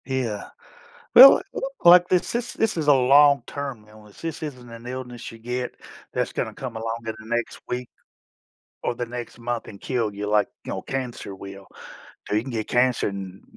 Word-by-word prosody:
Yeah, 125 Hz, -6 st, -3 dB, 0.7 s
well, 270 Hz, +6 st, +11 dB
l -, -, -3 dB, 0.2 s
like 175 Hz, +1 st, +8 dB
this 180 Hz, +5 st, +1 dB
is 240 Hz, 0 st, -2 dB
this 225 Hz, -1 st, 0 dB
is 160 Hz, -3 st, -2 dB
a 145 Hz, -, +8 dB
long 140 Hz, +2 st, +5 dB
term 135 Hz, -7 st, -6 dB
illness. 105 Hz, -1 st, -16 dB
This 165 Hz, -1 st, -5 dB
isn't 125 Hz, -5 st, -7 dB
an 115 Hz, 0 st, -11 dB
illness 125 Hz, -1 st, -7 dB
you 115 Hz, -, -12 dB
get 125 Hz, +2 st, -4 dB, 0.4 s
that's -, -, -1 dB
gonna -, -, -3 dB
come 130 Hz, -3 st, -7 dB
along 115 Hz, 0 st, -3 dB
in 110 Hz, -, -3 dB
the 110 Hz, 0 st, -12 dB
next 120 Hz, -, -3 dB
week 125 Hz, 0 st, -3 dB, 1.0 s
or -, -, -1 dB
the 120 Hz, -, -3 dB
next 120 Hz, 0 st, -7 dB
month 120 Hz, 0 st, -4 dB
and 100 Hz, -, -10 dB
kill 115 Hz, -4 st, -2 dB
you 100 Hz, +1 st, -4 dB
like, 105 Hz, -1 st, +2 dB, 0.2 s
you -, -, -6 dB
know, -, -, -3 dB
cancer 125 Hz, -6 st, -5 dB
will. 100 Hz, 0 st, -10 dB, 0.6 s
So -, -, -2 dB
you 105 Hz, -, +3 dB
can 130 Hz, -, -7 dB
get 110 Hz, -3 st, -3 dB
cancer 125 Hz, 0 st, +2 dB
n 95 Hz, -1 st, -7 dB
120 Hz, 195 wpm, -24 LUFS, 110-135 Hz, 1.0 s, well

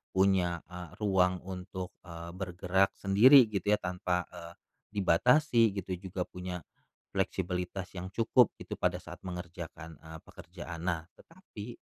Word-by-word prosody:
punya, 95 Hz, -3 st, +2 dB
eee, 90 Hz, -2 st, -7 dB
ruang 90 Hz, -3 st, +2 dB
untuk, 95 Hz, 0 st, -6 dB, 0.2 s
eee, 85 Hz, 0 st, -7 dB
bergerak 90 Hz, +1 st, 0 dB
sendiri 120 Hz, +8 st, +7 dB
gitu 100 Hz, 0 st, -2 dB
ya -, -, -8 dB
tanpa, 90 Hz, -1 st, -1 dB
eee, 85 Hz, 0 st, -9 dB, 0.4 s
dibatasi, 115 Hz, -, +4 dB
gitu 95 Hz, -1 st, -4 dB
juga 95 Hz, -1 st, -3 dB
punya 90 Hz, -3 st, -6 dB, 0.5 s
fleksibilitas 90 Hz, +1 st, -2 dB
yang 90 Hz, +1 st, -5 dB
cukup 120 Hz, +1 st, +4 dB
gitu -, -, -5 dB
pada -, -, +1 dB
saat -, -, -9 dB
mengerjakan, 85 Hz, -2 st, -7 dB
eee, 80 Hz, 0 st, -10 dB
pekerjaan. 85 Hz, -1 st, -9 dB
Nah 85 Hz, -3 st, 0 dB, 0.2 s
tetapi, 120 Hz, -, -10 dB
90 Hz, 130 wpm, -31 LUFS, 90-100 Hz, 0.5 s, sendiri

